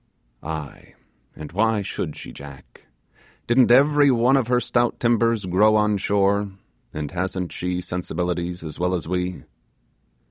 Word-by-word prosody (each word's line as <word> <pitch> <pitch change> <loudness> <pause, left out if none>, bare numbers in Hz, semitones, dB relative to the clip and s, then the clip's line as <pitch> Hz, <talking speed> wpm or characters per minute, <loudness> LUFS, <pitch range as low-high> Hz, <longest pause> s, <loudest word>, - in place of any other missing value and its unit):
Aye, 80 -2 -7 0.4
and 75 -1 -9
why 105 +2 +1
should 80 -5 -4
she, - - -9
Jack? 70 -1 -13 0.6
didn't 120 +1 +4
every 145 +3 +5
one 125 +1 +3
of 130 -4 +1
her 125 0 +2
stout 120 -1 0
timbers 115 -3 +1
grow 105 +4 +3
on 105 -1 +2
shore, 100 +1 +1 0.4
and 75 -2 -5
hasn't 90 0 -3
she 90 0 -3
sensibilities; 90 -1 -3
as 80 0 -8
well 90 +1 +1
as 85 - -5
we? 90 0 -3
95 Hz, 140 wpm, -23 LUFS, 90-115 Hz, 0.6 s, every